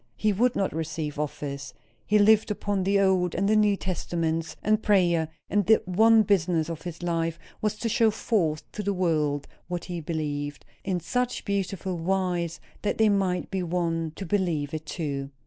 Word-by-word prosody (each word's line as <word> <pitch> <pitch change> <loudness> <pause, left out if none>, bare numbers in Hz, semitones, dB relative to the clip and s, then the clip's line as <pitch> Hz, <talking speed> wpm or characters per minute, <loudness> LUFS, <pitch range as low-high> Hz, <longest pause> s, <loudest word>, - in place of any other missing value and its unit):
He 215 -1 +2
would 245 +5 +2
not 195 - 0
receive 155 -2 -3
office. 140 -2 -4 0.3
He 210 - +4
lived 215 +1 +5
upon 205 -2 -1
the 200 +1 +3
Old 185 -3 +2
and 195 +3 +1
New 205 -1 +3
Testaments, 165 -3 -2
and 215 +1 +2
prayer; 175 -6 +3 0.2
and 205 -1 +1
the 220 - +5
one 220 +4 +5
business 175 -5 +1
of 160 - -6
his 175 -1 -7
life 165 -1 -1 0.2
was 215 -1 0
to 230 - -2
show 225 0 +3
forth 185 -8 0
to 210 - -4
the 200 -1 -1
world 155 -5 0 0.2
what 175 -1 -4
he 175 -2 -5
believed, 145 -2 -3 0.2
in 185 -2 -1
such 250 +8 -2
beautiful 190 -3 -2
wise 175 -1 -1 0.2
that 210 - -1
they 220 -1 +4
might 190 -3 0
be 190 -1 -1
won 165 -2 -1
to 195 - -6
believe 165 -7 0
it 155 0 -5
too." 140 -5 -3
180 Hz, 175 wpm, -26 LUFS, 160-200 Hz, 0.3 s, lived